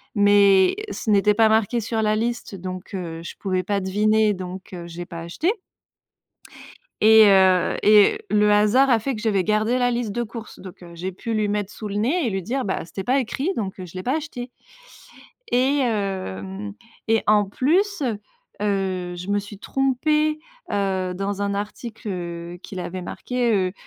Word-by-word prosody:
mais 200 -2 +5 0.2
ce - - -4
n'était 210 0 +4
pas 220 +1 +4
marqué 220 +1 +2
sur 225 0 -2
la 215 0 +2
liste 235 -1 -3
donc, 185 +1 -7
heu, 170 -3 -5
je 170 - -8
pouvais 185 -2 -1
pas 200 +2 0
deviner 210 +3 +2
donc, 185 0 -8
heu, 175 -1 -7
j'ai 175 +1 -7
pas 170 -1 -8
acheté 170 - -1 1.5
et 220 0 +8
heu, 190 -2 +4
et 210 - +6
le 210 0 +4
hasard 210 +6 +4
a 240 -3 +4
fait 265 +5 -2
que 215 - -6
j'avais 205 -4 +1
gardé 215 +4 +1
la 245 -1 +2
liste 235 -3 -2
de 240 - -1
courses. 230 -1 -8
Donc, 185 -1 -11
heu, 170 -1 -11
j'ai 180 +3 -5
pu 225 +5 -4
lui 215 -1 +1
mettre 205 -1 -2
sous 215 - -7
le 200 - -4
nez 265 +9 +1
et - - 0
lui 190 -1 -2
dire: 255 +7 -2
«Bah 190 - -2
c'était 190 +2 -6
pas 260 +3 +2
écrit, 265 +7 -2
donc 195 -3 -4
heu, 185 - -6
je 170 - -15
l'ai 185 - -4
pas 260 +9 0
acheté». 270 -6 -6 1.0
Et 265 +4 +3
hem 145 - -3 0.4
et 225 0 +3
en 210 0 +4
plus, 345 - +1 0.6
heu, 190 -3 -1
je 180 +2 -8
me 205 - +2
suis 205 0 -8
trompée, 300 +6 +1 0.3
heu, 190 -2 0
dans 195 +2 -3
un 200 0 -1
article, 215 +3 -6
heu, 175 -2 -5
qu'il 190 - -7
avait 180 +1 -5
marqué, 245 +5 -2
heu, 185 -2 +1
205 Hz, 185 wpm, -23 LUFS, 185-235 Hz, 1.5 s, et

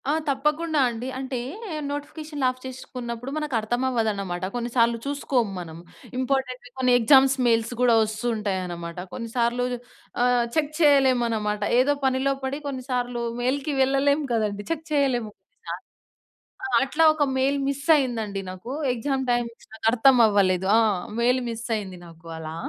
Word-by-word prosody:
ఆ! - - +4 0.2
తప్పకుండా 300 +3 0
అండి. 235 +2 -5
అంటే 260 -1 -3 0.5
నోటిఫికేషన్‌లు 295 0 -4
ఆఫ్ 255 0 -7
చేసుకున్నప్పుడు 250 -1 -6
మనకర్థమవ్వదన్నమాట. 225 -8 -1
కొన్నిసార్లు 235 -1 +1
చూసుకోము 275 -6 0
మనం. 165 -2 -8 0.4
ఇంపార్టెంట్‌వి 255 -1 -2
కొన్ని 255 -1 +3
ఎగ్జామ్స్ 265 +3 +5
మెయిల్స్ 230 0 +2
గూడా 245 -2 +5
వస్తూంటాయనమాట. 195 -6 -3 0.2
కొన్నిసార్లు 235 +1 -1 0.6
ఆహ్, 245 -1 +3
చెక్ 305 -2 +1
చేయలేమనమాట. 240 -8 +3 0.2
ఏదో 280 +3 +4
పనిలో 265 +1 +2
పడి 265 +2 -2
కొన్నిసార్లు 250 -3 -3 0.2
మెయిల్‌కి 275 +4 -1
వెళ్ళలేము 280 +2 +2
కదండీ! 210 -2 -1
చెక్ 320 -1 -3
చేయలేము. 260 -7 +1 0.4
ఆ! - - -2 1.1
అట్లా 305 +4 +1
ఒక 310 -1 +1
మెయిల్ 270 +2 +2
మిస్సయిందండి 260 -8 +1
నాకు, 185 +7 -8 0.2
ఎగ్సామ్ 265 +2 -1
టైమ్. 240 -1 +1 0.3
నాకర్థమవ్వలేదు. 220 -5 +4
ఆ! - - +6 0.4
మెయిల్ 250 +2 +3
మిస్ 230 0 -5
అయింది 190 -3 -7
నాకు 165 0 -15
అలా. 160 0 -6
245 Hz, 120 wpm, -25 LUFS, 225-270 Hz, 1.1 s, ఆ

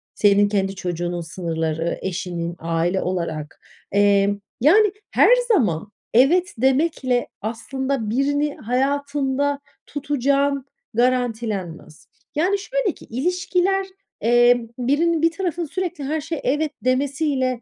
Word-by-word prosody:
senin 205 0 +4
kendi 195 -1 0
çocuğunun 175 -1 -3
sınırları, 165 -1 -3
eşinin 175 -2 -3
aile 170 +3 0
olarak 170 -4 -4 0.3
Emm, 200 0 +3 0.2
yani, 405 - +5 0.2
her - - +5 0.2
zaman 210 - +1 0.2
evet 345 +9 +4
demekle 260 -1 +1
aslında 240 +2 -3
birini 285 +5 0
hayatında 280 +2 0 0.3
tutacağın 280 -1 0 0.3
garantilenmez. 225 -10 -1 0.3
Yani, 365 +7 +2
şöyle - - -1
ki - - -15
ilişkiler, 360 - 0 0.4
eee, 240 +1 +4
birinin 300 +6 +1
bir 330 0 +4
tarafının 350 -1 -2
sürekli 360 -2 -4
her 305 +3 -1
şeye 320 0 -4
evet 295 +4 0
demesiyle 260 -1 0
255 Hz, 105 wpm, -22 LUFS, 200-295 Hz, 0.4 s, yani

